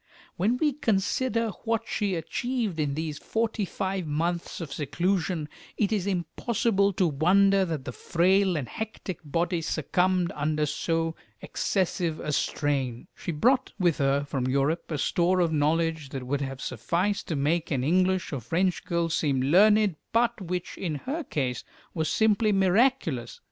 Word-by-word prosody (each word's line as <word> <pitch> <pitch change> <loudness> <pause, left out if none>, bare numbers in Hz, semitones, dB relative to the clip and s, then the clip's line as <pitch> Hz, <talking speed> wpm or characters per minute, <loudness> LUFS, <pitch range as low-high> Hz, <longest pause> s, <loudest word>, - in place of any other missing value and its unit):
When 215 +8 +1
we 300 +1 +1
consider 230 0 0
what 230 -1 0
she 200 -3 -1
achieved 215 - -2
in 145 -2 0
these 155 -1 -3
forty 225 -2 -1
five 190 -2 -3
months 170 +3 -2
of 155 -6 -6
seclusion, 175 +1 -1 0.3
it 205 -1 +1
is 200 -3 0
impossible 200 +3 +1
to 185 - +2
wonder 190 +6 +4
that 160 -6 -4
the - - -4
frail 185 +6 +2
and 135 -5 -3
hectic 220 - -6
body 170 +4 -1
succumbed 180 +3 +1
under 150 +1 0
so 165 +2 -1 0.3
excessive 175 -4 -1
a 150 - -3
strain. 135 -5 -1
She - - -4
brought 245 - +2
with 175 -5 +2
her 140 0 +2
from 135 -3 -2
Europe 140 +5 0
a 155 - -2
store 175 +5 +2
of 170 -2 +2
knowledge 160 0 +1
that 135 -1 -5
would 140 +2 -1
have 135 -1 -4
sufficed 195 +4 -1
to 160 - -2
make 155 +4 0
an 135 -4 0
English 185 +3 +1
or 140 - -2
French 170 - 0
girl 170 -1 0
seem 145 -4 0
learned, 195 +6 +4
but 230 -2 +1
which 180 -1 -4
in 165 -5 -2
her 285 - -4
case 130 - -2 0.3
was 160 -2 -1
simply 215 0 +3
miraculous. 190 - +2
170 Hz, 155 wpm, -27 LUFS, 150-200 Hz, 0.3 s, wonder